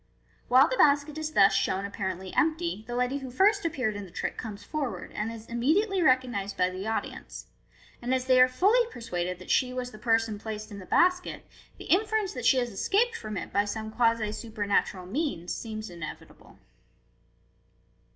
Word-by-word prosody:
While 255 +3 +6
the - - -2
basket 290 0 +4
is 310 0 -4
thus 195 -5 +6
shown 190 +1 0
apparently 190 -2 -4
empty, 320 - 0
the 240 - -4
lady 250 +3 0
who 265 -2 -7
first 400 - +3
appeared 255 -10 -1
in 205 - -5
the 190 - -11
trick - - -4
comes 205 -3 -7
forward, 285 -2 -4
and 215 +2 -3
is 225 -1 -9
immediately 345 - +1
recognized 245 - +1
by 180 0 +2
the 190 +3 -5
audi 225 - -1
ence - - -10
j - - -30
and 245 +1 -3
as 260 -1 +1
they 255 -1 +5
are 255 - +8
fully 385 - +3
persuaded 180 - -4
that 185 - -7
she 255 -1 +3
was 250 -1 -4
the 215 - -12
person 225 -2 +1
placed 215 0 -6
in 200 - -7
the 185 - -11
basket, 360 0 +2 0.3
the - - -10
inference 425 +1 +1
that 250 -3 -5
she 265 - +5
has 245 -2 0
escaped 435 - +1
from 215 - -5
it - - -6
by 200 - +3
some 220 +1 -5
quasi 230 -2 +2
supernatural 205 -4 -1
means 200 - -2
seems 215 -1 -6
inevitable. 170 -3 -10
235 Hz, 190 wpm, -28 LUFS, 205-285 Hz, 0.3 s, are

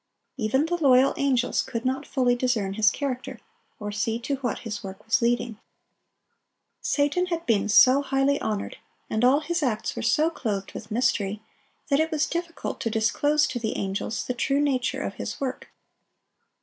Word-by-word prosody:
Even 265 +3 +1
the 350 +1 -1
loyal 260 0 +5
angels 255 -3 +1
could 230 0 -5
not 265 +2 -1
fully 250 -2 +2
discern 240 -6 0
his 215 +1 +4
character, 260 -2 -4 0.4
or 210 0 -4
see 220 +2 -1
to 270 +4 -3
what 255 -3 -3
his 210 -2 -5
work 195 +1 -9
was 225 - +2
leading. 235 -2 0 1.2
Satan 295 +5 +1
had 335 -2 -3
been 210 -3 +1
so 255 +6 +7
highly 275 0 +1
honored, 210 -2 -3 0.3
and 220 +2 0
all 265 +4 +5
his 340 +2 -2
acts 235 -6 -1
were - - -4
so 315 +2 +2
clothed 200 -9 -3
with 215 - -8
mystery, 215 -3 0 0.5
that 280 0 +3
it 320 +1 +2
was 310 -2 +1
difficult 340 0 -4
to 230 - 0
disclose 290 +7 +2
to 255 -5 -3
the 225 -2 -2
angels 195 +3 -3
the 250 - -2
true 275 +3 0
nature 265 -3 0
of - - -3
his - - -5
work. 265 -2 -4
250 Hz, 175 wpm, -25 LUFS, 220-280 Hz, 1.2 s, so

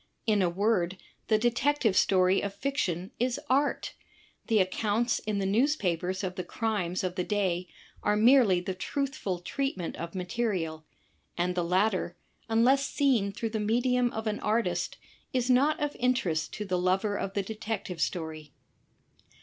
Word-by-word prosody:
In 210 -3 +3
a 180 - +3
word, 185 -1 +1 0.3
the 215 - +4
Detective 240 0 +1
Story 185 0 +4
of 200 -1 -4
fiction 195 - -2
is 250 +3 0
art; 280 +2 +1 0.5
the 225 - +3
accounts 210 +5 +1
in 210 -1 -2
the 195 - 0
newspapers 190 - +1
of 185 -1 -2
the 185 -1 -4
crimes 190 -3 -2
of 185 -1 -1
the 180 -1 -1
day 185 -3 -1 0.3
are 210 - +2
merely 220 -4 +5
the 185 +1 -3
truthful 265 -1 -3
treatment 185 0 -3
of 170 +2 -6
materia 185 -2 -1
l; 160 0 -13 0.5
and 180 +1 +1
the 180 -1 0
latter, 185 0 +1 0.3
unless 255 +5 +4
seen 245 -8 +2
through 225 +3 -4
the 220 - -2
medium 245 +3 +2
of 220 +1 -5
an 210 -1 -1
artist, 225 +2 0 0.4
is 255 0 +1
not 280 +5 +3
of 295 0 -2
interest 240 -11 0
to 210 - -4
the 180 -2 0
lover 190 +3 +1
of 195 -1 -4
the 200 - +1
Detective 210 -4 -4
Story. 155 -3 -3
205 Hz, 160 wpm, -29 LUFS, 180-235 Hz, 0.5 s, merely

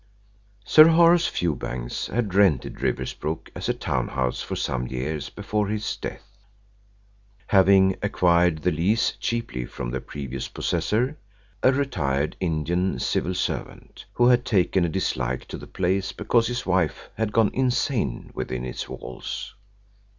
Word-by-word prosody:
Sir 155 0 +8
Horace 170 +1 +5
Fewbanks 60 -7 -3
had 110 -4 -2
rented 95 -9 +2
Riversbrook 80 +2 -3
as - - -4
a - - +3
town - - -1
house 65 -2 -2
for - - -4
some 65 -1 -2
years 70 +4 -3
before 105 0 -2
his 105 0 -2
death, 100 0 -9 1.1
having 95 -1 +5
acquired 85 -4 +2
the 90 - +3
lease 95 +9 +2
cheaply 115 - -2
from - - -5
the 65 0 -3
previous 65 -2 -6
possessor, 125 +8 -1 0.4
a 130 - +5
retired 75 - -1
Indian 85 +2 0
civil 90 +1 -1
servant, - - -4
who 120 - +3
had 125 0 +5
taken 95 -6 +2
a 85 - +1
dislike 65 -8 -2
to - - -5
the - - -10
place 95 +1 -1
because 115 -1 +2
his 125 0 -3
wife 90 -5 0
had 110 -1 -2
gone 110 -1 +3
insane 125 - 0
within 65 -1 -4
its 60 - -5
walls. 65 - -6
95 Hz, 140 wpm, -24 LUFS, 75-110 Hz, 1.1 s, Sir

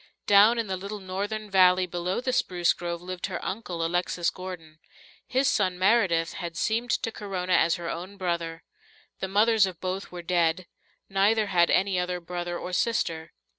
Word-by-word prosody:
Down 205 +4 +6
in 230 - 0
the 190 -2 -3
little 200 +3 -6
northern 200 +3 -4
valley 185 -1 +5
below 180 +4 -2
the 255 0 -1
spruce 175 -7 +2
grove 170 0 -5
lived 185 +1 -4
her 185 -3 -4
uncle, 180 -5 -3
Alexis 175 0 0
Gordon. 170 -4 -9 0.5
His 265 +1 +1
son, 185 -6 +1
Meredith, 185 -4 +2
had 170 -2 -6
seemed 230 +5 0
to 225 - 0
Corona 185 -4 -3
as 165 -1 +4
her 170 -2 -6
own 185 +5 -6
brother. 170 -3 -3 0.6
The 190 - -2
mothers 210 +1 +4
of 180 -3 -8
both 185 +1 -4
were 175 -1 -7
dead; 170 0 +1 0.4
neither 205 +3 +2
had 175 -4 +3
any 190 -1 +2
other 180 0 -2
brother 175 0 -4
or 180 - -6
sister. 170 -7 -1
185 Hz, 170 wpm, -27 LUFS, 175-200 Hz, 0.6 s, Down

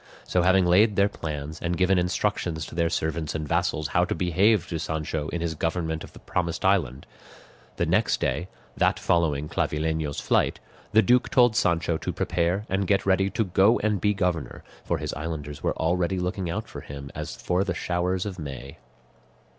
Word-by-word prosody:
So 90 - +1
having 95 +1 +4
laid 100 +4 +4
their 100 +1 +4
plans 75 -3 -6
and 85 0 -1
given 95 0 +3
instructions 90 -3 -1
to - - -11
their 85 0 +1
servants 80 -1 -2
and 75 -1 -3
vassals 85 -3 0
how - - +3
to - - -2
behave 90 +2 +2
to 80 - -3
Sancho 80 -1 -3
in 85 - -3
his 85 -1 -1
government 80 0 -2
of - - -12
the - - -13
promised 85 -1 -2
island, 75 -9 +1 0.7
the - - 0
next - - +2
day, 90 - -1 0.3
that - - +2
following 75 -4 +1
Clavileño's 75 -1 -1
flight, - - +1 0.3
the 110 +1 +5
duke 125 +5 +3
told 125 -4 +4
Sancho 85 -6 +1
to - - -3
prepare 90 +4 0
and 95 0 -1
get 100 -1 +2
ready 95 0 +3
to 110 +3 0
go 95 +4 +4
and 105 -3 0
be 105 0 +2
governor, 90 -5 -2 0.2
for - - -1
his - - -4
islanders 75 -2 -5
were - - -1
already 90 +3 0
looking 90 0 -2
out 105 +6 -3
for - - -8
him 70 0 -8
as - - -5
for 90 +2 0
the 95 -4 -2
showers 90 +2 -1
of 95 -3 -5
May. 70 -2 -7
85 Hz, 185 wpm, -26 LUFS, 80-95 Hz, 0.7 s, the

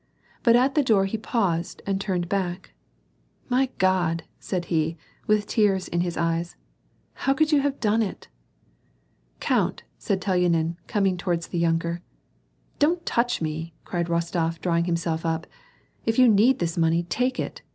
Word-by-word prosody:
But 235 -2 +5
at 260 +3 +3
the 300 - +3
door 215 -7 +3
he 195 - -2
paused 190 -8 -1
and 195 -1 -1
turned 185 -4 -1
hack, 185 -2 -2 0.4
" - - -39
My 260 +1 +3
God! 175 -3 +1
" - - -41
said 180 -2 -3
he, 160 +1 +1 0.3
with 210 -1 +3
tears 200 -4 +1
in 170 - -1
his 175 -1 -2
eyes; 165 +1 -1 0.3
" - - -40
how 270 - +4
could 310 +2 +2
you 295 -2 +4
have 280 0 -1
done 220 +1 +2
it? 210 - -4 0.6
'' - - -40
"Count!" - - 0 0.2
said 195 - -1
Telyanin, 175 -3 +1
coming 195 -3 +1
towards 175 -2 -2
the 175 - -2
yunker. 170 +1 0 0.8
"Don't 335 +4 +2
touch 240 -6 0
me," 160 +1 -4
cried 175 -2 -2
Bostof, 170 -1 -1
drawing 170 -1 +1
himself 170 -2 -1
up. 165 -1 -1 0.3
" - - -37
If 225 - +1
you 255 -1 +7
need 225 +4 +5
this 170 0 -2
money, 165 +1 +2
take 250 +10 -1
it." - - -4
180 Hz, 170 wpm, -25 LUFS, 165-215 Hz, 0.8 s, you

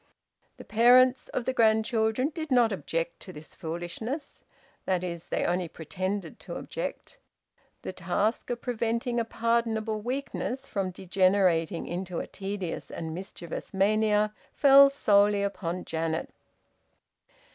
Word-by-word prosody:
The - - -11
parents 250 +3 +5
of 245 - -3
the 260 - 0
grandchildren 220 +2 +2
did 315 0 -5
not 245 -4 +4
object 165 -1 -3
to 185 - -10
this 150 -3 -10
foolishness 175 - -5 0.4
that 185 -1 0
is, 170 -2 -5
they - - -1
only 175 0 0
pretended 185 +5 -4
to - - -8
object. - - -6 0.6
The - - -5
task 185 +5 -1
of 240 -1 -3
preventing 235 0 -1
a 230 - 0
pardonable 225 -2 0
weakness 265 +1 -3
from 195 -2 -2
degenerating 185 -2 +1
into 180 0 -4
a - - -2
tedious 195 -3 -5
and 160 -1 -5
mischievous 180 0 -7
mania 210 +1 +2 0.2
fell 275 0 +8
solely 205 -6 +3
upon 185 -3 -3
Janet. 160 0 -2
205 Hz, 125 wpm, -28 LUFS, 180-235 Hz, 0.6 s, fell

